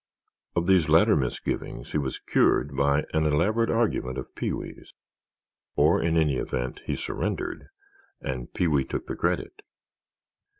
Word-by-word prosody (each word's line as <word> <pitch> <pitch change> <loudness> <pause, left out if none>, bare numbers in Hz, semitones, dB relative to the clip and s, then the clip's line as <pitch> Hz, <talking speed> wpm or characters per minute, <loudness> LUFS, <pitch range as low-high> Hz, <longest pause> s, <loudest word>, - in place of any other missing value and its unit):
Of 85 -1 +1
these 90 -4 +4
latter 85 +7 +6
misgivings 65 -5 -3
he 75 - +1
was 70 -2 -3
cured 70 -1 +2
by 70 +2 +2
an 80 0 +2
elaborate 105 +10 +2
argument 105 - 0
of 65 - -7
Pee - - -2
wee's. - - -7 0.8
Or, - - +4
in 85 0 +1
any 75 -5 +2
event, 60 0 -3
he - - 0
surrendered—and 65 -2 -5
Pee 90 - +1
wee 70 -4 +2
took 65 - -4
the - - -4
credit. 90 - -2
75 Hz, 140 wpm, -26 LUFS, 70-90 Hz, 0.8 s, latter